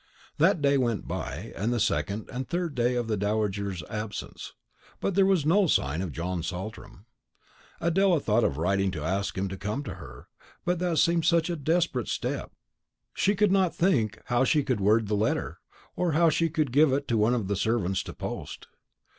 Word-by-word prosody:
That 155 - +3
day 140 -1 +4
went 120 -5 -1
by, 80 - -5
and 110 +5 -1
the 120 - 0
second 105 0 -1
and 130 +1 -4
third 175 -3 -2
day 125 -1 +1
of 120 -2 -1
the 110 - 0
dowager's 100 -3 -1
absence; 105 -1 -6 0.5
but 195 - -1
there 190 +1 +4
was 185 -7 +2
no 185 +5 +4
sign 75 - +1
of 95 -4 -3
John 85 +3 -3
Saltram. 95 +5 -7 0.7
Adela 175 0 +3
thought 115 -3 +1
of 70 - 0
writing 95 +4 +1
to 75 -4 -5
ask 95 +5 -2
him 95 +1 -1
to 95 0 -6
come 105 +9 -3
to 105 - -6
her; 60 -6 -12 0.4
but 175 -1 0
that 175 -2 0
seemed 170 0 +3
such 170 0 +3
a - - -1
desperate 160 -5 0
step, - - -3 0.6
she 200 +3 +1
could 205 0 +3
not 190 -3 +2
think 115 - +1
how 120 +1 +2
she 145 +1 +2
should 125 -6 0
word 105 +2 +3
the 105 - -2
letter, 105 +2 -1 0.4
or 175 -3 0
how 165 +1 +4
she 165 +2 +1
could 155 -4 -1
give 145 +2 +5
it 140 +1 -1
to 120 - 0
one 110 +3 +3
of 110 -6 -2
the 100 - 0
servants 100 -2 0
to - - -8
post. - - -6
120 Hz, 195 wpm, -27 LUFS, 100-165 Hz, 0.7 s, give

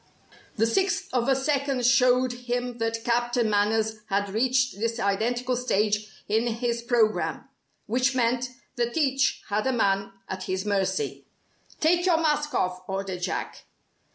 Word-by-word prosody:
The 220 - +3
sixth 380 +8 0
of 250 0 +1
a 270 - +4
second 270 -2 0
showed 250 0 +4
him 245 0 -3
that 225 0 -2
Captain 240 0 +1
Manners 215 +1 +1
had 200 0 0
reached 255 +2 +1
this 230 +1 -1
identical 240 +5 0
stage 210 -3 0 0.2
in 220 +3 +1
his 235 0 -1
programme: 235 -3 +1 0.4
which 255 +4 +1
meant 245 +1 +1 0.3
that 240 +3 -1
each 270 -3 +1
had 210 +4 0
a - - +2
man 200 -5 +1 0.2
at 190 0 -5
his 185 +1 -2
mercy. 205 - -1 0.5
"Take 345 +3 +3
your 345 -3 +4
mask 300 -2 0
off," 180 0 0
ordered 190 -2 -4
Jack. 180 - -4
240 Hz, 145 wpm, -26 LUFS, 210-255 Hz, 0.5 s, a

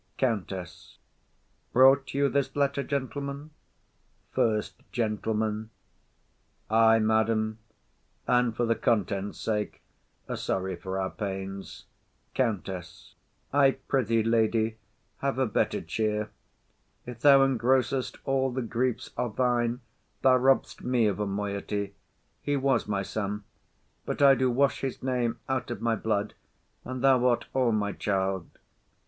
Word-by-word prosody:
COUNTESS. 95 -7 -3 0.8
Brought 135 +1 +5
you 140 0 +3
this 140 -1 -1
letter, 140 -1 +1
gentlemen? 140 +2 -4 0.8
FIRST 105 -5 0
GENTLEMAN. 110 -1 -1 1.0
Ay, 115 0 +6
madam; 110 0 +1 0.7
And 125 -2 +2
for 120 - +2
the 115 - +3
contents' 105 -3 -1
sake, 105 -2 -2 0.4
are - - -3
sorry 95 -1 -2
for 95 +2 -4
our 95 0 -2
pains. 95 -1 -6 0.5
COUNTESS. 95 -7 -3 0.4
I 140 -2 +4
pr'ythee, 115 -4 +2
lady, 110 -1 +2 0.4
have 140 -1 -1
a 130 - +2
better 105 - 0
cheer; 105 -1 -2 0.7
If 120 -1 -8
thou 140 +1 +7
engrossest 130 0 +1
all 135 -1 +1
the 130 0 -2
griefs 120 +2 -2
are 125 - 0
thine, 120 +2 0 0.4
Thou 130 -1 +6
robb'st 135 +1 +2
me 125 -2 +2
of 105 -1 0
a 105 - -1
moiety. 100 0 -3 0.5
He 145 -1 0
was 135 -5 +1
my 100 -2 -1
son, 105 +1 -3 0.6
But - - -3
I 140 -1 +8
do 130 0 +2
wash 135 +3 +2
his 135 -2 -4
name 125 -3 0
out 130 -1 -2
of 120 - -4
my 115 -1 +1
blood, 105 -1 -1 0.5
And 130 0 -5
thou 130 -2 +5
art 120 -1 +1
all 125 -3 +2
my 105 -2 0
child. 95 -3 -1
115 Hz, 130 wpm, -28 LUFS, 105-130 Hz, 1.0 s, I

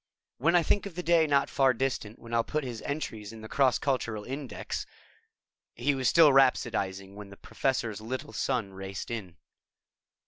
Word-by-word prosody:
When 165 +7 +3
I 175 - +5
think 200 +4 +1
of 185 - -11
the 180 - -4
day 165 -1 +4
not 140 -1 +3
far 135 -2 +3
distant 115 -4 -2
when 115 0 -11
I'll 115 0 +3
put 155 +4 -2
his 120 -4 -5
entries 110 -8 -4
in 110 -1 -10
the 110 - -8
cross 130 0 +3
cultural 115 -6 -1
index 135 +3 -5 0.4
..." - - -64
He 135 +5 +1
was 130 -2 +1
still 160 -4 +7
rhapsodizing 100 -8 +2
when 105 -1 -9
the 100 - -12
Professor's 120 -6 -2
Little 130 +6 -5
Son 105 -6 -1
raced 95 +3 -6
in. 95 -7 -6
125 Hz, 180 wpm, -29 LUFS, 110-140 Hz, 0.4 s, still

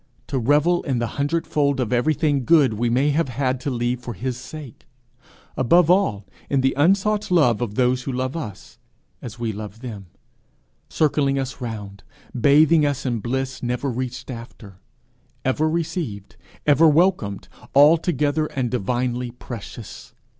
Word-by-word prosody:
to 135 - -2
revel 150 +8 +3
in 135 -4 -2
the 120 - 0 0.2
hundredfold 145 -2 0
of 125 -2 -1
everything 145 +1 +1
good 145 -4 +4
we 120 +3 -1
may 135 +5 +2
have 150 -1 0
had 130 0 -1
to 135 - -3
leave 120 -1 -1
for 120 -2 -7
his 125 +1 -3
sake 130 0 -10 0.7
above 170 +7 +4
all, 115 - +1 0.2
in 140 -2 +2
the 135 0 +2
unsought 200 +7 +2
love 135 - +3
of 110 -4 -3
those 125 +1 +2
who 135 - -4
love 130 +2 -3
us 110 - -8 0.4
as 120 -1 -8
we 115 -2 -3
love 105 +2 -8
them 105 -7 -8 0.8
circling 140 -3 +1
us 135 0 -4
round, 105 -4 -6 0.3
bathing 150 +5 +5
us 140 -2 -1
in 120 -3 -1
bliss 130 +3 -3
never 125 +3 -2
reached 125 +1 -5
after, 115 -5 -11 0.7
ever 150 +4 +1
received, 160 - -4 0.3
ever 150 +2 +5
welcomed, 155 - +2 0.3
altogether 150 0 +4
and 130 -5 -3
divinely 125 +2 -1
precious! 120 -2 -10
130 Hz, 145 wpm, -22 LUFS, 120-150 Hz, 0.8 s, bathing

